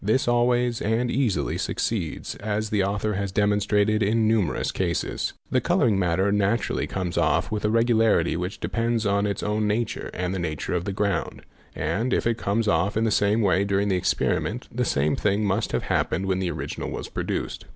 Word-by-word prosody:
This 110 +6 +1
always 120 0 +2
and 115 +3 0
easily 125 -7 0
succeeds 95 -9 -2
as 105 +1 -2
the 105 -2 +2
author 105 +2 -1
has 100 0 -2
demonstrated 105 +1 +2
in 110 +2 +2
numerous 110 -7 +1
cases. - - -2
_ - - -33
The - - +2
colouring 105 -5 +2
matter 95 +2 +1
naturally 105 +3 0
comes 90 -2 -2
off - - +1
with 105 -1 -2
a - - +3
regularity 115 -7 +3
which 90 +3 -4
de - - -3
pends 115 -1 0
on 100 0 +2
its 100 -2 -3
own 105 0 0
nature 110 +2 -2
and 90 0 -3
the 95 - -2
nature 80 -2 -3
of 90 0 -1
the 100 - -2
ground; 100 +1 -2 0.3
and, 110 +12 0
if - - -1
it 115 0 0
comes 110 +3 0
off 90 +4 +1
in 110 - +2
the 110 - +1
same 105 +2 +2
way 95 -1 +3
during 100 0 0
the 95 - +2
experiment, 90 +3 -1
the 125 +1 0
same 75 -3 +1
thing 105 +1 +1
must 100 +3 0
have - - -1
happened 95 +4 0
when 95 -1 0
the 95 -2 -1
original - - -4
was - - -5
produced. - - -4
105 Hz, 200 wpm, -25 LUFS, 95-110 Hz, 0.3 s, a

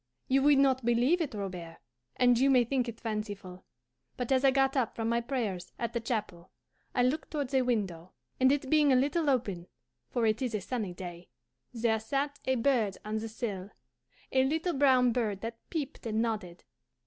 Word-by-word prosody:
"You 270 +1 +3
would 290 0 +5
not 265 -2 +3
believe 240 +9 +3
it, 290 -8 -3
Robert, 180 -5 -6 0.4
and 245 -1 +4
you 270 +2 +4
may 255 -2 +5
think 250 0 -1
it 225 - -9
fanciful, 205 -5 -5 0.5
but 250 0 -3
as 260 0 +3
I 270 - +7
got 270 0 +2
up 255 -5 0
from 225 -1 -2
my 235 0 +1
prayers 230 -8 -3
at 235 - -3
the 235 - 0
chapel 210 -7 -4 0.5
I 245 - +3
looked 275 +6 0
towards 285 -4 -3
a 265 - +4
window, 195 -9 -2 0.3
and 260 0 +5
it 280 -1 0
being 295 0 +4
a - - +5
little 290 +4 +2
open, 200 -10 -1 0.4
for 240 -2 0
it 215 +2 +1
is 245 -4 -1
a 210 - -2
sunny 205 -4 -3
day, 175 -1 -8 0.4
there 230 -2 +1
sat 280 +5 -2
a 260 - +2
bird 230 -6 +1
on 215 +1 -2
the 225 +1 -5
sill, 205 -4 -4 0.6
a 260 0 +4
little 320 +6 0
brown 260 -3 +4
bird 215 -5 -1
that 230 0 -7
peeped 295 -7 -4
and 220 0 -1
nodded. 215 -7 -3
240 Hz, 195 wpm, -30 LUFS, 215-270 Hz, 0.6 s, I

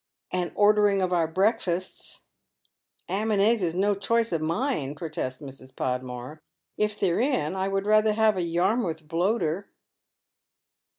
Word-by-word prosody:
" - - -60
And 180 -1 -1
ordering 205 -1 +4
of 180 0 0
our 170 -2 +2
breakfastes." 185 -1 -1 0.4
" - - -45
'Am 205 +5 -1
and 210 -2 +2
eggs 220 +2 +3
is 170 -2 -1
no 200 +3 +2
choice 230 +4 0
of 165 -2 0
mine," 165 - -1
protests 150 -5 -4
Mrs. 135 -2 -12
Podmore. 125 +3 -4 0.2
" - - -62
If 210 0 -1
they're 180 -1 +1
in, 240 - 0
I 190 0 -1
would 195 0 -1
rather 215 0 +4
have 220 -1 +3
a 185 - -1
Yarmouth 170 -1 0
bloater." 180 +1 0
185 Hz, 160 wpm, -26 LUFS, 160-210 Hz, 0.4 s, ordering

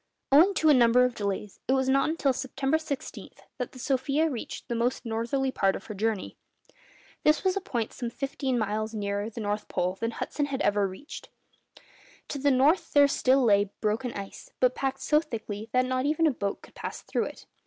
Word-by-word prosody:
Owing 345 +8 +6
to 315 - +3
a - - +8
number 250 -1 +5
of 250 - -1
delays, 200 -1 -4
it 260 - +3
was 265 -1 +1
not 275 +2 +3
until 290 -4 +1
September 270 +3 -1
16 295 -4 -6 0.3
that 250 - -3
the - - -13
'Sofia' 275 +4 +1
reached 240 - -6
the - - -2
most 240 +2 -1
northerly 235 +4 -1
part 195 -5 +1
of - - -8
her 215 - -6
journey. 210 0 -2 0.9
This 305 +1 +3
was 375 0 +2
a 395 - -1
point 235 -9 -3
some 240 - -4
fifteen 270 +1 -2
miles 215 0 -2
nearer 205 0 -2
the 230 0 -7
North 210 0 -2
Pole 180 +1 -1
than 230 - -1
Hudson 285 +5 -3
had 270 -2 -2
reached. 200 +7 -3 1.0
To 285 - -4
the 285 +1 +3
north 280 +7 +3
there 285 -1 +7
still 270 -1 +3
lay 205 -3 +4
broken 225 +4 -1
ice, 195 -1 -8
but 255 -1 +4
packed 270 0 -2
so 300 - +3
thickly 225 -7 -6
that 255 0 +3
not 255 +1 0
even 310 +2 +2
a 310 - +4
boat 200 -5 -4
could - - -15
pass - - -6
through - - -1
it. - - -9
255 Hz, 200 wpm, -28 LUFS, 220-280 Hz, 1.0 s, a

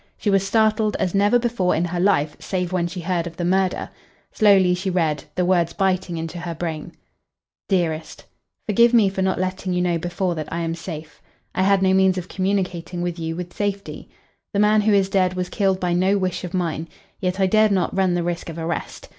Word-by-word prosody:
She 205 - 0
was 195 -1 +4
startled 215 +1 +2
as 180 - -1
never 205 +4 +4
before 230 -6 0
in 170 - +1
her 175 0 -3
life 155 -6 +2
save 180 -2 -3
when 175 -2 +1
she 175 +1 -6
heard 170 0 -1
of 165 -1 -10
the 175 - -2
murder. 190 +1 0 0.4
Slowly 195 -4 +4
she 185 +2 -2
read, 160 -5 0
the 180 - +1
words 175 -2 +2
biting 185 -3 0
into 165 +2 -5
her 170 0 -5
brain 165 0 -5 0.8
"DEAREST, 165 -5 -1 0.4
Forgive 235 +3 +4
me 215 -4 +5
for 190 0 -3
not 190 -1 0
letting 185 0 -2
you 180 - +1
know 175 -2 +1
before 175 +2 -2
that 155 -2 -6
I 170 - -2
am 165 0 -2
safe. 165 -2 -8 0.3
I - - 0
had 195 0 +3
no 190 0 +4
means 190 -1 +3
of 185 0 -5
communicating 185 -3 -2
with 175 -1 -3
you 165 0 -3
with 175 0 -6
safety. 200 -1 -4 0.5
The - - +2
man 210 +1 +4
who 215 +1 +2
is 200 -2 +3
dead 185 -2 +1
was 180 -1 -3
killed 195 -2 +1
by 180 -1 0
no 190 +3 +2
wish 185 -2 -2
of 180 0 -5
mine. 165 -3 -2 0.3
Yet 185 -1 -2
I 190 - +4
dared 215 +2 +4
not 185 -3 0
run 190 -2 +2
the 175 - 0
risk 175 0 -3
of 165 - -7
arrest. 165 0 -4
185 Hz, 215 wpm, -22 LUFS, 170-195 Hz, 0.8 s, me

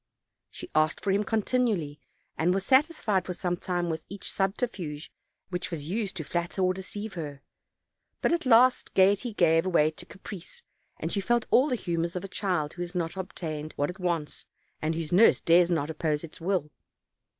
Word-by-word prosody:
She - - -9
asked 155 0 +2
for 200 - 0
him 200 +2 +2
continually, 215 - 0 0.4
and 180 +3 +2
was 195 0 -1
satisfied 260 - +3
for 180 - -4
some 175 0 -1
time 175 -1 -2
with 160 -1 -3
each 200 -1 -6
subterfuge 190 - -2 0.4
which 180 0 -3
was 155 -4 -5
used 200 +1 -2
to 160 - -4
flatter 175 +4 -2
or 185 0 +3
deceive 205 +3 -5
her; 145 -5 -6 0.8
but - - +2
at 340 -5 -1
last 250 +1 +5
gayety 200 +5 +4
gave 165 -3 +3
way 155 -4 +3
to - - -13
caprice, 200 - -10 0.3
and - - -3
she 200 - 0
felt 240 +3 +1
all 270 +4 +5
the 255 - +1
humors 170 -4 -2
of 180 - -3
a - - -5
child 180 -6 -1
who 175 - -7
has 175 +1 -5
not 170 -1 -2
obtained 160 -5 -5
what 145 +4 -1
it 185 - -15
wants 170 -4 -2 0.3
and 160 +1 0
whose 160 -2 -4
nurse 215 +6 +6
dares 170 +1 +5
not 160 -3 0
oppose 155 -1 -1
its 165 0 -10
will. 175 -4 -1
180 Hz, 185 wpm, -28 LUFS, 165-200 Hz, 0.8 s, nurse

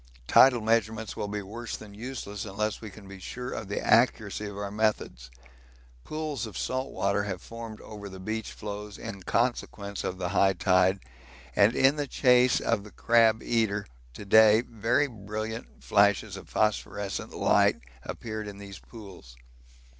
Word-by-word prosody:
Tidal 125 - +6
measurements 110 0 0
will 105 - -3
be 105 0 -4
worse 115 +4 -6
than 105 -2 -12
useless 105 -3 -6
unless 105 +1 -3
we 110 - -7
can 100 0 -13
be 100 0 -10
sure 125 +7 -6
of 110 - -5
the 100 - -2
accuracy 110 -4 +2
of 100 -1 -8
our 100 -1 -4
methods. 105 - -1 0.7
Pools 155 - -4
of 110 - -8
salt 130 +1 -2
water 100 +1 0
have 95 -3 -4
formed 115 +1 -9
over 105 -2 -9
the 95 0 -10
beach 110 +3 -4
floes 105 0 -7
in 110 -4 -7
consequence 100 -2 -1
of 90 - -3
the 90 -1 -2
high 95 +1 +3
tide, 95 +1 +3 0.5
and 105 +4 +5
in 135 +3 +4
the 145 -1 -2
chase 125 -2 +4
of 115 -3 0
the 105 - -11
crab 115 0 +3
eater 105 -3 0 0.3
to 105 - -8
day 110 +2 +7
very 120 +4 +1
brilliant 110 -1 -6
flashes 100 0 +3
of 100 - -11
phosphorescent 100 -2 -1
light - - +3 0.3
appeared 110 -2 -5
in 100 -1 -8
these 100 -1 -10
pools. 95 - -13
105 Hz, 160 wpm, -28 LUFS, 100-115 Hz, 0.7 s, day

